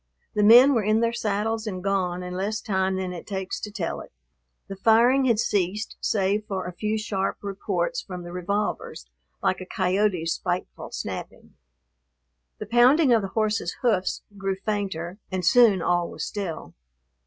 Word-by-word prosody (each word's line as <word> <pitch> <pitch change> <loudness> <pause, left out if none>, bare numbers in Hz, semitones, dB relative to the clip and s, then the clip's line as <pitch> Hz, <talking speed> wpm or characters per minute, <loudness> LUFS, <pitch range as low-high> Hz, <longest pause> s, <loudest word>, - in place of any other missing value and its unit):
The 210 - +1
men 240 +7 +8
were 230 - +2
in 215 +2 +2
their 230 0 +1
saddles 220 0 -1
and 185 -3 -4
gone 185 -2 -1
in 180 0 -6
less 200 +4 -2
time 190 -3 0
than 185 -1 -3
it 175 - -9
takes 190 -2 -4
to 210 - -6
tell 195 -6 -3
it. - - -13 0.6
The 195 - -6
firing 235 +6 +4
had 235 -4 +3
ceased 205 0 -1
save 205 +1 0
for 190 -2 -3
a 180 - -5
few 215 +4 -2
sharp 200 -3 -2
reports 205 - -2
from 180 -2 -8
the 175 - -8
revolvers, 180 - -3 0.4
like 185 - +1
a - - -6
coyote's 185 -3 +1
spiteful 180 0 -4
snapping. - - -7 1.0
The - - -6
pounding 250 +5 +5
of 225 - +4
the 195 - -3
horse's 215 -4 0
hoofs 205 -6 +1 0.2
grew 195 -1 -1
fainter, 195 -3 -3
and 185 -2 -2
soon 215 -5 +5
all 175 0 +1
was - - -5
still. 195 -6 -5
200 Hz, 165 wpm, -25 LUFS, 185-220 Hz, 1.0 s, men